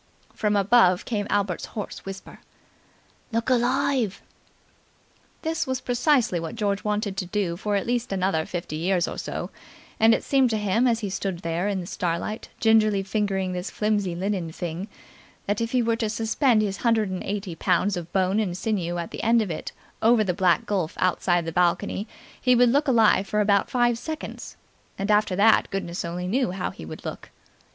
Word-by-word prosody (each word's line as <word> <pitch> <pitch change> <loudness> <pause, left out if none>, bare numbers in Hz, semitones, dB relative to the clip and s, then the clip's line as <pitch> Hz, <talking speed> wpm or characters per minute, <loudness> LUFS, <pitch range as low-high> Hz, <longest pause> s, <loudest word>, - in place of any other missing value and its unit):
From 210 -1 0
above 195 -3 +4
came 205 -4 -2
Albert's 200 -4 0
hoarse 210 - -6
whisper. 195 0 -9 0.9
"Look 230 +3 0
alive!" 250 -3 +1 1.2
This 320 -3 -1
was 260 -1 -1
precisely 245 - +2
what 165 +4 -5
George 205 -3 -1
wanted 210 -2 -1
to 185 - -2
do 185 -3 -1
for 205 +3 -2
at 200 - 0
least 240 -1 -1
another 185 -4 0
fifty 170 -3 -4
years 180 +1 +1
or - - -5
so; - - -5 0.5
and 225 +1 +6
it - - -4
seemed 270 -2 +3
to 220 - 0
him 210 +4 +2
as 230 -1 +1
he 200 -3 -3
stood 190 -2 -3
there 170 +3 -1
in 200 -2 -1
the - - -7
starlight, 175 +5 -3
gingerly 215 -3 +4
fingering 195 -2 -1
this 180 +2 -4
flimsy 205 -4 0
linen 185 -2 -2
thing, 175 +3 -5 0.6
that 205 +2 -1
if 230 - -1
he 250 0 +1
were 230 0 +1
to 225 -2 -1
suspend 225 +1 +2
his 195 -2 -2
hundred 220 -4 +1
and 185 - -4
eighty 200 -3 -4
pounds 200 +4 +1
of 175 -1 -6
bone 190 +2 +1
and 185 -5 -1
sinew 185 -5 -1
at 170 -1 -4
the - - -5
end 230 +1 +4
of 210 -5 -1
it 155 - -5 0.3
over 225 0 +5
the 185 -3 0
black 175 -3 +2
gulf 185 -6 -1
outside 175 -1 +1
the 165 - -3
balcony 180 +4 0 0.3
he 250 -1 +4
would 245 0 +5
look 285 +5 +2
alive 220 -5 +4
for 210 - 0
about 200 -1 +3
five 240 -2 +2
seconds, 315 +4 -7 0.4
and 200 +2 -1
after 210 -2 +3
that 215 +3 +4
goodness 180 -2 -3
only 175 +1 -4
knew 250 +5 +1
how 180 0 -3
he 80 - -10
would 80 - -9
look. - - -6
205 Hz, 190 wpm, -25 LUFS, 180-225 Hz, 1.2 s, and